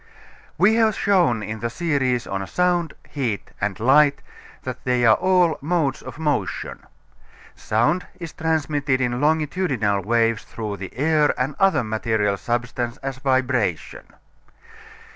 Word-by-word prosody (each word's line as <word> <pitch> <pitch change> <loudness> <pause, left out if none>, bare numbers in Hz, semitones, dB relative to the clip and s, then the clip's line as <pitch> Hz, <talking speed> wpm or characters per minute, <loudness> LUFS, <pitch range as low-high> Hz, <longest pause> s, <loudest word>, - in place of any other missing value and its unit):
We 195 +6 +5
have 220 -2 +3
shown 175 - +2
in 110 +2 -5
the 115 +2 -2
series 130 -3 0
on 95 0 -4
Sound, 175 -2 0
Heat 120 -9 -3
and 100 -2 -1
Light 140 +4 +4 0.4
that 130 0 -6
they 125 -1 +1
are 110 - +7
all 180 +2 +2
modes 150 -3 0
of - - -9
motion. 150 -2 -2 0.8
Sound 120 +12 0
is 170 -2 -7
transmitted 150 -4 0
in 125 0 -1
longitudinal 150 - +1
waves 115 0 +1
through 105 -3 -6
air 150 +2 +2
and 130 +3 0
other 195 -9 +3
material 110 -2 0
substance 120 +2 -3
as 135 -1 -4
vibration. 130 - -1
130 Hz, 125 wpm, -22 LUFS, 115-160 Hz, 0.8 s, are